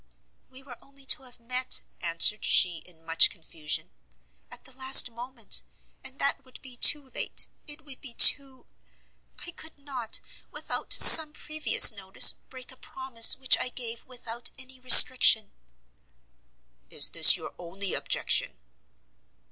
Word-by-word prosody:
"We 260 +1 -17
were 255 -3 -16
only 275 0 -21
to 270 - -1
have 250 -2 -16
met," 250 +2 -4 0.2
answered 170 +5 -1
she, 175 -3 -2
in 165 -2 -22
much 165 0 +2
confusion, 155 -2 -10 0.6
"at - - -14
the 260 - -13
last 260 -1 +2
moment, 235 -1 -7 0.4
and 265 +1 -12
that 275 0 -5
would 255 -1 -21
be 260 -2 -17
too 275 +2 +1
late - - -5 0.2
it 295 0 -11
would 275 -3 -14
be 245 -4 -12
too 270 -2 +2 0.8
I 345 - -10
could 320 -2 -14
not, 265 -5 -10 0.3
without - - -9
some 310 -1 +8
previous 310 -3 +2
notice, 195 -2 +2
break 260 -1 -17
a 260 - -14
promise 260 -4 -1
which 260 -1 0
I - - -5
gave 235 -2 -8
without 240 -2 -7
any 260 -1 -13
restriction." 255 -3 +4 1.4
"Is - - 0
this - - +4
your - - -13
only 185 +3 -8
objection?" - - -4
255 Hz, 140 wpm, -22 LUFS, 225-270 Hz, 1.4 s, some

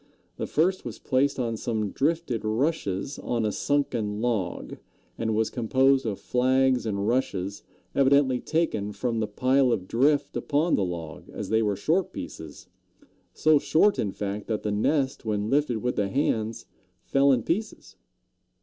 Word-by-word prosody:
The - - -3
first 185 +5 +1
was - - -6
placed 140 +1 +1
on 115 -3 -1
some 110 -3 -2
drifted 150 -6 -1
rushes 110 - -1
on 115 -2 -1
a 105 - +1
sunken 120 -8 -1
log, 110 -7 -2 0.4
and 110 -1 -1
was 110 0 +1
composed 130 +2 +2
of 100 -3 -3
flags 130 0 +2
and 100 -1 -1
rushes 100 -6 -1 0.3
evidently 135 -2 +3
taken 115 -12 -1
from 115 0 -2
the 110 - 0
pile 130 +5 +2
of 95 -6 -1
drift 140 +5 +2
upon 155 +4 0
the 100 - +3
log, 85 -3 -6
as - - -6
they 110 0 +3
were 105 -2 +1
short 165 - 0
pieces, 80 -3 -8 0.7
so 155 +8 +4
short, 200 +8 +3
in 100 - 0
fact, 100 +1 -4
that 110 -2 -2
the 105 - -1
nest 130 +6 0
when 105 -1 -2
lifted 135 -6 +1
with 125 - -1
the 100 - +1
hands 115 -4 -1 0.4
fell 140 0 +3
in 125 -4 +2
pieces. 210 +7 -3
120 Hz, 160 wpm, -26 LUFS, 105-140 Hz, 0.7 s, so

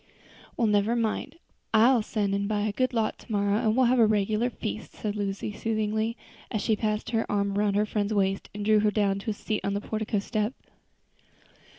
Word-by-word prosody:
"Well, 235 - +2
never 210 +2 +2
mind, 230 +6 -1 0.4
I'll 235 +2 +6
send 205 -2 -1
and 200 0 0
buy 210 -1 0
a 210 0 0
good 255 +5 0
lot 225 -3 -1
tomorrow, 205 -1 0
and 225 -1 +1
we'll 260 - +5
have 250 +1 +3
a 225 - +6
regular 215 +3 +1
feast," 220 -2 -6
said 210 -1 -4
Lucy, 200 0 -3
soothingly, 220 +1 -1 0.3
as 215 -4 -2
she 220 - +2
passed 215 0 -2
her 225 -1 0
arm 200 -1 0
around 205 -1 +1
her 210 +1 +3
friend's 210 0 -1
waist 195 -2 0
and 205 0 -4
drew 215 0 +5
her 210 0 +3
down 200 -2 +1
to 220 - -5
a - - 0
seat 210 +1 -3
on 200 0 -1
the 200 - -1
portico 215 0 -2
step. 215 +3 -1
215 Hz, 205 wpm, -27 LUFS, 205-220 Hz, 0.4 s, I'll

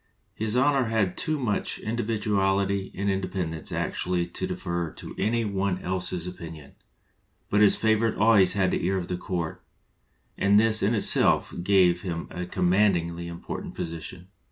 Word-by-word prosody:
His 110 +1 -2
Honor 135 0 +3
had 110 -5 0
too 155 0 -1
much 120 -7 -1
individuality 100 -4 0
and 100 +1 -2
independence 95 -4 -2
actually 90 -1 -1
to 90 +2 -4
defer 85 -2 -3
to - - -9
any 115 +1 +1
one 100 -2 -1
else's 90 -1 -2
opinion, 80 -5 -9 0.8
but 105 - +3
his 105 - +6
favorite 110 0 +1
always 105 -4 +5
had 95 -2 +1
the - - -1
ear 95 +2 +1
of 90 -2 -4
the 90 - -1
court, 90 -3 -4 0.8
and 100 +1 +5
this 110 0 +3
in 105 +4 +2
itself 105 - +4
gave 90 -2 +3
him 85 -3 -4
a 90 0 -5
commandingly 90 -2 +1
important 85 0 -7
position. 85 +1 -6
95 Hz, 150 wpm, -26 LUFS, 90-105 Hz, 0.8 s, his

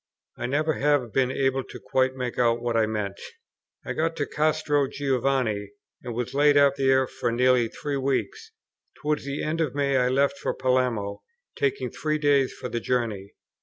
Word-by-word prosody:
I 120 - -4
never 155 +4 +1
have 140 -5 +1
been 130 -1 +2
able 135 0 0 0.2
quite 130 0 +1
to - - -15
make 125 -1 -4
out 120 -1 +3
what 120 0 -2
I 110 -1 +3
meant. 105 -2 -3 0.6
I - - -3
got 165 +1 -1
to 145 - -1
Castro 150 -2 +1
Giovanni, 130 -7 -1 0.3
and 120 - -6
was 120 -1 -3
laid 145 +1 +4
up 140 -1 +5
there 130 -1 +3
for 120 - -3
nearly 125 0 +3
three 140 +5 -4
weeks. 135 - -2 0.5
Towards 150 -1 -1
the 140 0 -3
end 160 +2 -1
of 145 -4 -1
May 140 -1 +1
I 125 -1 +3
left 140 +2 +1
for - - -2
Palermo, 125 -6 0 0.3
taking 415 -1 -1
three 155 -1 -1
days 145 -3 +3
for 130 - -7
the 120 -1 -3
journey. 110 -6 -2
130 Hz, 180 wpm, -25 LUFS, 120-145 Hz, 0.6 s, up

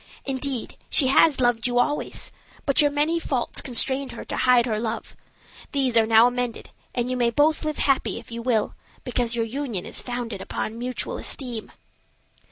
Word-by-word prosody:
Indeed, 265 -2 -2
she 265 -4 +6
has 280 +1 +5
loved 240 -2 +2
you 245 0 -1
always, 290 +4 0 0.3
but 275 0 +4
your 295 - +4
many 300 +4 +1
faults 260 -7 -1
constrained 265 +2 -1
her - - -8
to - - -4
hide 250 -2 +4
her 220 -3 -1
love. 230 0 -4 0.6
These 265 -4 +1
are 225 -1 +5
now 225 +1 +7
amended, 245 -1 -2 0.2
and 245 +1 -1
you - - 0
may 240 -1 +2
both 300 +7 +2
live 305 -1 -2
happy 275 -2 +1
if - - -11
you 235 0 -5
will, 230 -3 0 0.3
because 245 -1 -1
your 230 -1 0
union 235 -6 -4
is - - -1
founded 240 -5 -4
upon 225 +2 -4
mutual 250 +1 -4
esteem." 245 -5 -2
245 Hz, 175 wpm, -24 LUFS, 230-275 Hz, 0.6 s, now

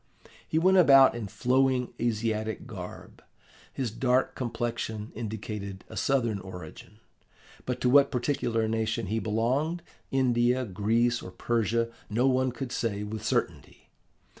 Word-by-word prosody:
He 160 - -1
went 185 +3 +4
about 135 -5 +7
in 115 -3 -5
flowing 130 +3 +1
Asiatic 110 -1 -1
garb; 95 -7 -9 0.5
his 125 -5 -3
dark 130 +3 +1
complexion 115 -3 -4
indicated 105 -3 -6
a - - -9
Southern 120 -7 +1
origin, 90 +1 -10 0.7
but 125 -1 -2
to - - +2
what 140 0 +6
particular 120 -4 0
nation 110 -1 -1
he 110 +4 -1
belonged, 130 +11 0 0.3
India, 125 -1 +2
Greece, 115 +4 +1
or - - -8
Persia, 115 +3 0 0.2
no 115 +4 +1
one 130 0 +2
could 125 +1 -6
say 105 -4 -2
with 110 +1 -6
certainty. 110 - -3
115 Hz, 130 wpm, -28 LUFS, 110-130 Hz, 0.7 s, about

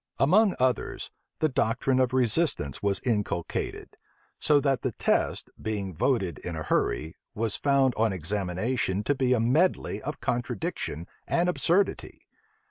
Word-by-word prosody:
Among 190 +8 +4
others, 130 0 -1 0.3
the 155 - +4
doctrine 130 0 +1
of 130 -1 +2
resistance 125 - +1
was 100 -1 0
inculcated; 105 -7 -2 0.4
so 150 -1 +4
that 135 -2 +1
the - - -2
test, - - 0
being 100 -4 -3
voted 95 - 0
in 85 - -5
a 80 - -4
hurry, 80 +1 0 0.2
was 110 -1 0
found 140 -2 +3
on 110 -1 +2
examination 95 +4 -1
to 145 - +2
be 130 -2 +1
a 125 - +2
medley 140 +11 +1
of 150 -1 -5
contradiction 120 - -3 0.2
and 170 +1 +2
absurdity. 180 +2 0
120 Hz, 135 wpm, -27 LUFS, 100-140 Hz, 0.4 s, Among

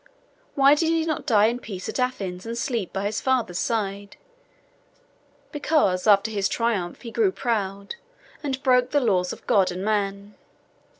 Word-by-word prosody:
Why 275 0 +6
did 320 +2 +1
he 330 -1 +1
not 310 -2 -3
die 215 -5 +5
in 235 +2 0
peace 190 -6 -7
at - - -4
Athens, 195 -8 -2
and 230 +1 -5
sleep 235 -5 -2
by 195 +1 -3
his 210 +2 -2
father's 245 -9 0
side? 200 -3 -3 1.3
Because 290 - +1
after 210 +1 +4
his 200 -2 0
triumph 220 -6 -2
he 230 - -7
grew 410 - +2
proud, 200 - -3 0.4
and 270 -2 -4
broke 250 -2 +3
the 290 - +2
laws 185 -8 +1
of - - -10
God 195 -2 +3
and 185 +2 -5
man. 200 -1 -2
220 Hz, 165 wpm, -24 LUFS, 195-260 Hz, 1.3 s, Why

